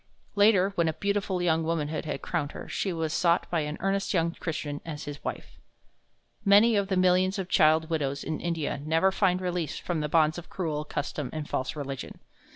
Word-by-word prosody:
Later, 200 -2 +4
when 170 -3 +1
a 160 - +1
beautiful 195 +1 -1
young 165 -2 +2
womanhood 160 -1 -2
had - - -4
crowned 155 -4 -2
her, - - -8
she 195 - -2
was 160 -2 -2
sought 170 -1 +2
by 170 - +2
an 150 0 -3
earnest 195 +2 0
young 165 -1 +2
Christian 150 -4 -4
as 155 -2 -6
his 145 -1 -7
wife. - - -6 0.8
Many 210 +3 +6
of 200 -1 +1
the 190 -1 0
millions 185 +1 +3
of 190 - -2
the 180 - -9
child 160 +1 +4
widows 140 -3 -1
in 155 +1 -3
India 160 -4 -2
never 165 +5 +3
find 190 -2 +2
release 180 -3 -2
from 175 -3 -3
the 150 0 -2
bonds 155 +1 +3
of 175 - -13
cruel 155 -5 -3
custom 145 -2 -4
and 155 -2 -5
false 130 +3 -2
religion. 140 -3 -6
165 Hz, 200 wpm, -28 LUFS, 155-185 Hz, 0.8 s, Many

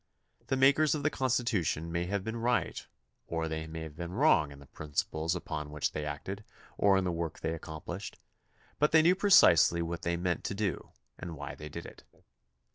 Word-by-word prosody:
The 135 - 0
makers 140 +4 +4
of 150 - -4
the 150 - +2
Constitution 115 - 0
may 85 +1 -1
have 100 0 -2
been 110 +2 -4
right 120 +1 0 0.4
or 80 -1 -2
they 80 0 -4
may 80 0 -6
have 80 -2 -8
been 85 +2 -6
wrong 95 - +3
in 70 - -11
the 70 - -14
principles 80 +4 -2
upon 75 -4 -5
which 75 0 -2
they 75 - -4
acted 95 +8 -5 0.3
or 100 -1 +4
in 95 - +1
the 90 - 0
work 85 -1 -4
they 80 0 -1
accomplished, 80 +4 -7 0.6
but 150 +2 +3
they 160 -1 +7
knew 175 +3 +6
precisely 85 - +6
what 85 0 -4
they 85 0 -1
meant 90 0 -1
to 95 - -2
do 100 -6 -2 0.3
and 85 -2 -6
why 70 -1 -6
they 75 - -9
did - - -7
it. - - -12
85 Hz, 200 wpm, -31 LUFS, 80-110 Hz, 0.6 s, they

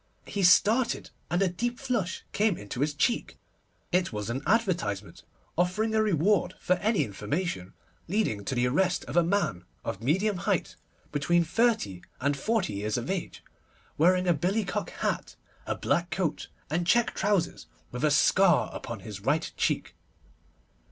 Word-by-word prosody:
He 200 - -3
started, 215 +6 +4 0.2
and 175 +3 +2
a - - +3
deep 240 +7 -2
flush 235 -9 -2
came 210 -3 +2
into 105 +4 -7
his 145 +1 0
cheek. 235 - 0 0.5
It 180 -1 +2
was 105 0 -3
an 130 +3 -3
advertisement 180 - 0 0.3
offering 185 +6 +1
a 220 - +3
reward 185 -1 +2
for 180 - +2
any 210 +4 +2
information 105 - -3 0.3
leading 170 - 0
to 135 - -2
the 120 0 +2
arrest 180 +8 +1
of - - -7
a 175 - +6
man 170 - 0 0.2
of 95 - -4
medium 190 - +1
height, 175 - -1 0.4
between 170 +4 +2
thirty 190 - +1 0.2
and 140 +2 +1
forty 210 - 0
years 105 +2 -2
of 120 +8 -3
age, 190 -3 -4 0.5
wearing 180 +3 +3
a 175 - +5
billy 190 +8 0
cock 205 +3 -3
hat, - - -3 0.3
a - - 0
black 175 +1 0
coat, 175 -5 -2 0.2
and 170 +2 0
check 235 +2 +3
trousers, 190 -3 0 0.2
and - - -36
with 125 - -4
a 155 - +5
scar 175 +5 +4
upon 115 -4 -6
his 100 0 -7
right 145 +10 0
cheek. - - -1
175 Hz, 160 wpm, -28 LUFS, 135-205 Hz, 0.5 s, a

